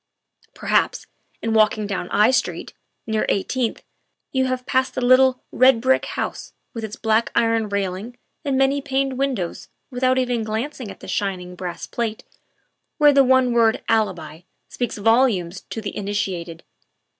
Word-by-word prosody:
Perhaps, - - 0 0.4
in 225 - 0
walking 215 -1 +3
down 195 -3 -4
I 210 +4 +4
Street, 260 - -1 0.3
near 220 -1 0
Eighteenth, 230 +4 -1 0.5
you 260 -1 +1
have 255 -1 -2
passed 260 0 0
the 250 - -1
little, 255 0 +4
red 255 -2 +5
brick 260 +3 +2
house - - -5 0.2
with 230 - -6
its 215 -1 -5
black 220 +1 +1
iron 225 -2 +2
railing 200 +4 -3 0.3
and 275 -3 0
many 270 +1 +2
paned 270 -1 -1
win 275 -1 +1
dows 180 -5 -5 0.2
without 255 +1 +1
even 245 -3 0
glancing 225 +2 -4
at - - -11
the - - -10
shining 185 -3 -3
brass 180 -1 -6
plate 225 -2 -4 0.7
where 295 -2 +6
the 275 0 +6
one 260 -1 +3
word 230 -2 +3
"Alibi" 180 -8 -1 0.3
speaks 245 -3 -3
volumes 205 -5 +2
to 225 - -5
the 210 - -4
in 205 - -4
itiated. 175 -5 -3
230 Hz, 155 wpm, -22 LUFS, 205-260 Hz, 0.7 s, where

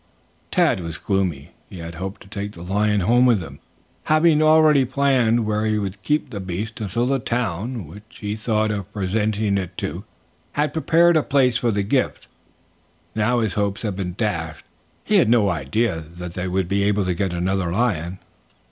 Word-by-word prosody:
Tad 165 - +2
was 85 -2 -6
gloomy. 95 -8 -2 0.2
He - - -10
had 85 0 -7
hoped 95 +4 -6
to - - -14
take 100 +1 -5
the 85 - -10
lion 105 +2 +1
home 120 +7 +4
with 115 -4 +4
them, 75 -5 -9 0.5
having 155 0 +4
already 155 -2 +5
planned 125 -3 +2
where 105 0 0
he 110 -1 +1
would 100 -1 -4
keep 150 +5 0
the 100 - -5
beast 100 +5 -5
until 110 +4 -1
the 135 +1 +1
town, 115 -2 -2
which 100 +8 -14
he 105 0 -2
thought 110 0 0
of 100 -1 -5
presenting 105 +1 0
it 90 -1 -6
to, - - -4 0.5
had 150 0 0
prepared 165 +1 +4
a - - +4
place 130 -5 +2
for 120 0 0
the 100 -2 0
gift. 125 +6 0 0.9
Now 110 +3 +1
his 110 -4 -1
hopes 100 +1 -1
had 105 -4 -2
been 90 -2 -4
dashed. 80 - -3 0.4
He - - +2
had - - +4
no 115 -4 +4
idea 90 - -1
that 90 -1 -7
they 90 +1 -3
would 95 0 0
be 100 +2 0
able 100 -1 +1
to 90 - 0
get 95 +1 -1
another 90 0 -1
lion. 95 -4 -1
105 Hz, 185 wpm, -22 LUFS, 95-120 Hz, 0.9 s, already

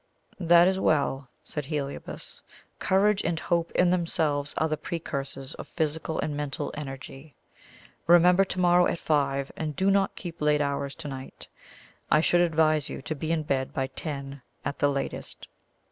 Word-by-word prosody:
"That 175 0 +6
is 190 0 +1
well," 140 -5 +1
said 150 -2 -5
Heliobas. 140 -1 -5 0.4
"Courage 195 +2 +3
and 165 -1 -1
hope 170 +1 0
in 180 -1 +4
themselves 155 -5 0
are 160 - +2
the 155 - 0
precursors 140 -3 -5
of - - -9
physical 160 0 -2
and 150 - -2
mental 145 -2 -3
energy. 135 0 -8 0.7
Remember 175 +2 +6
to 190 -1 -3
morrow 175 0 +5
at - - -1
five, 140 -3 0
and 155 -2 -4
do 190 +6 +2
not 195 -1 +2
keep 170 -3 -8
late 150 0 +3
hours 140 -1 -1
to 165 -2 -7
night. 135 -1 -8 0.6
I - - +5
should 175 +2 +3
advise 155 -3 +2
you - - -6
to 130 - -3
be 155 +2 -3
in 160 -2 +1
bed 135 -2 -1
by 135 - 0
ten 140 0 -5 0.2
at 140 - -3
the 145 - +3
latest." 140 -1 -4
155 Hz, 165 wpm, -27 LUFS, 140-170 Hz, 0.7 s, That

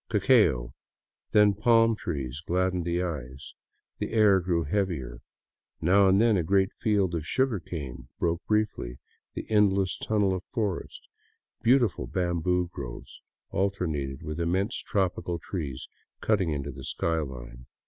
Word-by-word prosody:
Cacao, 95 - +3 0.6
then 105 -1 +5
palm 115 +2 +4
trees 70 -6 -4
gladdened 90 0 0
the 85 +1 0
eyes; 70 -6 -6 0.5
the - - -3
air 105 -4 +5
grew 85 -2 0
heavier; 75 -9 -2 0.6
now 95 +4 +4
and 95 +1 +4
then 115 -2 +4
a 90 - +1
great 95 +3 +2
field 100 -5 +1
of 80 -3 -2
sugar 130 -3 +1
cane 65 -7 -7
broke 85 0 -1
briefly 105 - -1 0.4
the - - -5
endless 100 -3 +2
tunnel 105 -3 +1
of 95 0 -4
forest; 105 -8 -4 0.5
beautiful 120 -1 +3
bamboo 90 0 0
groves 65 -4 -8 0.3
alternated 80 -9 -2
with 75 +2 -5
immense 95 +6 0
tropical 90 -3 -1
trees 75 -7 -5 0.3
cutting 100 -6 +1
into 70 -2 -3
the 65 0 -10
sky 80 +5 -1
line. 60 -4 -8
90 Hz, 135 wpm, -27 LUFS, 75-100 Hz, 0.6 s, then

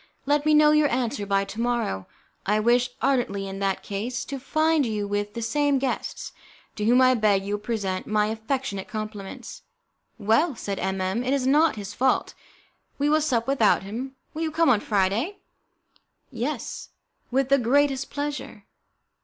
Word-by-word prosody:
Let 290 +1 +1
me 305 - +5
know 300 0 +6
your 300 -1 +4
answer 235 -4 -1
by 195 0 +2
to 205 +3 -6
morrow. 235 - -1 0.4
I 210 +2 +3
wish 240 +3 +3
ardently, 240 -7 +1
in 195 0 -6
that 195 -1 -1
case, 235 +5 -4
to 275 -1 -5
find 310 +3 +2
you 210 -4 -2
with 205 +1 -2
the 235 - -3
same 290 +3 +2
guests, 265 -1 -3 0.5
to 210 - -1
whom 245 +3 +5
I 255 0 +6
beg 210 -4 +2
you 200 - -3
will 205 - -2
present 200 -5 -2
my 210 -1 +2
affectionate 220 -1 -3
compliments." 215 -3 -7 0.6
"Well," 230 +8 +2
said 200 -3 -4
M 190 0 -2
M, 190 +6 -1
"it 255 +2 0
is 265 -2 -1
not 300 +2 +4
his 205 -1 -7
fault. 260 +1 +1 0.6
We 285 +1 +1
will 310 +1 +3
sup 245 -7 +1
without 245 -8 +3
him. 245 +7 -6 0.2
Will 315 - -5
you 325 - 0
come 325 -1 +2
on 230 -5 +5
Friday?" 210 - 0 0.9
"Yes, 250 +1 -4 0.4
with 265 +1 +1
the 275 0 +5
greatest 275 +2 +2
pleasure. 290 0 -5
240 Hz, 170 wpm, -25 LUFS, 205-275 Hz, 0.9 s, know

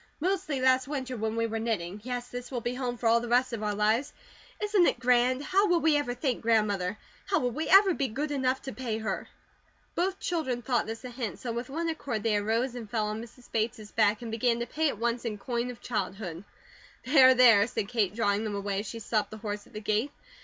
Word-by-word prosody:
"Mostly 350 -4 -1
last 260 0 +3
winter 265 -3 -3
when 220 -1 -2
we 230 0 +1
were 225 0 -2
knitting. 205 -4 -2
Yes, 245 0 -4
this 245 0 -6
will 255 - -3
be 240 +1 -3
home 250 -1 -3
for 235 - -7
all 230 +1 +5
the 240 - -5
rest 245 +1 +2
of 225 - -3
our 210 -1 -1
lives. 220 +7 +1 0.5
Isn't 415 -4 +3
it - - 0
grand? 250 +2 +3
How 390 +6 +3
will 350 -2 +3
we 315 -2 +3
ever 285 -4 0
thank 250 -1 -1
Grandmother? 210 -4 +1 0.3
How - - +2
will 245 -1 0
we 310 +7 -3
ever 390 -1 +7
be 275 -4 -1
good 290 +6 -3
enough 265 -2 0
to 265 - -6
pay 235 -4 -3
her?" 215 -3 -3 0.7
Both 375 +2 -1
children 260 -9 -2
thought 240 -2 0
this 225 +3 -6
a 250 - -6
hint, 235 -7 -4
so 240 - -5
with 235 +2 -4
one 330 +4 -2
accord 280 -9 -3
they 225 -2 +2
arose 225 +5 0
and 235 -4 -7
fell 215 -1 0
on 215 +1 -4
Mrs. 240 +2 -14
Bates' 220 -1 -2
back, 215 +1 +2
and 230 - -5
began 235 +1 +1
to - - -1
pay 310 +5 0
at 225 - -5
once 235 +2 -1
in 220 -3 -3
coin 235 +3 -2
of 245 - -9
childhood. 195 -6 -4 0.6
"There, 260 -2 +7
there," 230 -4 +7
said 220 -4 -3
Kate, 215 -4 0
drawing 205 -2 +1
them 215 -2 -3
away 200 -1 -2
as 205 - -5
she 230 - -6
stopped 220 -1 -1
the 215 - -8
horse 210 -1 -5
at - - -21
the 215 - -6
gate. 215 +6 0
240 Hz, 240 wpm, -29 LUFS, 215-260 Hz, 0.7 s, ever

